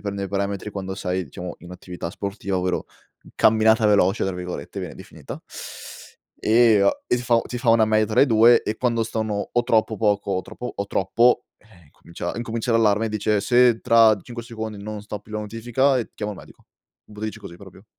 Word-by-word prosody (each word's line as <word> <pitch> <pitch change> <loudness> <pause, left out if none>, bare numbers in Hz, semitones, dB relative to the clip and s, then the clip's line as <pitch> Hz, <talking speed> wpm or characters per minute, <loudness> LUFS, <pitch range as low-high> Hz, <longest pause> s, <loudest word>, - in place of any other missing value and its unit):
prende 100 0 -3
i 95 - -6
parametri, 100 +1 -3
quando 95 -2 -5
sei, 95 -1 -2
diciamo, 90 +4 -8
in 85 - -13
attività 90 -1 -7
sportiva, 100 0 -4
ovvero 90 0 -1 0.5
"camminata 110 0 +4
veloce" 100 -1 +3
tra 95 -1 -2
virgolette, 90 0 -6
viene - - -6
definita. - - -10 1.0
E 110 -2 +4 0.2
e - - +2
si 120 - -4
fa 120 -1 +3
ti 125 - -6
fa 120 0 -3
una 115 -1 +5
media 110 0 +2
tra 110 - +2
i - - +4
2 115 0 +5
e 110 - -3
quando 115 -2 +1
stanno 110 -2 -3
o 120 - +2
troppo 110 -1 +1
poco 105 -2 +1
o 95 - 0
troppo 125 +5 -7
o 100 - -3
troppo, 115 +6 +2
eh 90 -9 -22
comincia 85 +3 -7
incomincia 115 0 -2
l'allarme 110 -1 +3
e - - -2
dice: 105 0 0
"Se 120 +1 +4
tra 115 -2 +5
5 120 -1 -8
secondi, 110 -3 -7
non 105 0 -6
stoppi 105 0 -8
la 105 0 -3
notifica, 120 +5 0
ehm, 120 - -3
chiama 105 -1 -4
il 100 - -11
medico," - - -16 0.5
lo 105 - -11
dice 110 0 -4
così 95 -4 -10
proprio. 95 +1 -15
110 Hz, 195 wpm, -23 LUFS, 100-115 Hz, 1.0 s, una